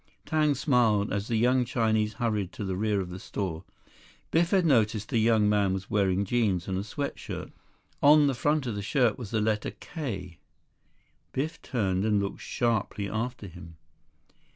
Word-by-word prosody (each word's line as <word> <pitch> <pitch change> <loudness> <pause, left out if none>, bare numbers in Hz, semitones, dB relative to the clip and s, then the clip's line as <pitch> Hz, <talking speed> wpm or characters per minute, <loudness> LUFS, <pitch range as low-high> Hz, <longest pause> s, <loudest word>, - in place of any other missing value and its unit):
Tang 155 -2 +2
smiled 115 -8 +2
as 100 +1 -2
the 115 - -1
young 125 +3 +3
Chinese 110 -3 0
hurried 105 -6 -1
to 105 - -5
the 95 -1 -2
rear 105 0 0
of 90 -1 -6
the 90 - -7
store. 90 -5 -4 0.7
Biff 170 +1 +3
had 190 -3 +3
noticed 110 -7 +2
the 115 - +1
young 110 -1 +3
man 100 -2 +2
was 95 0 -7
wearing 100 -1 +2
jeans 100 -6 0
and 95 - -2
a - - -3
sweat 140 +7 -4
shirt. - - -6 0.5
On 150 +1 +7
the 140 - +2
front 145 +3 0
of 120 - -2
the 100 - -4
shirt 120 +2 +1
was 115 -5 -6
the 110 - 0
letter 105 0 0
"K!" 95 - -6 0.9
Biff 155 +5 -3
turned 95 -6 -1
and 105 -1 +2
looked 100 0 -4
sharply 110 -4 -1
after 115 +2 -3
him. 85 -3 -11
110 Hz, 175 wpm, -28 LUFS, 100-125 Hz, 0.9 s, On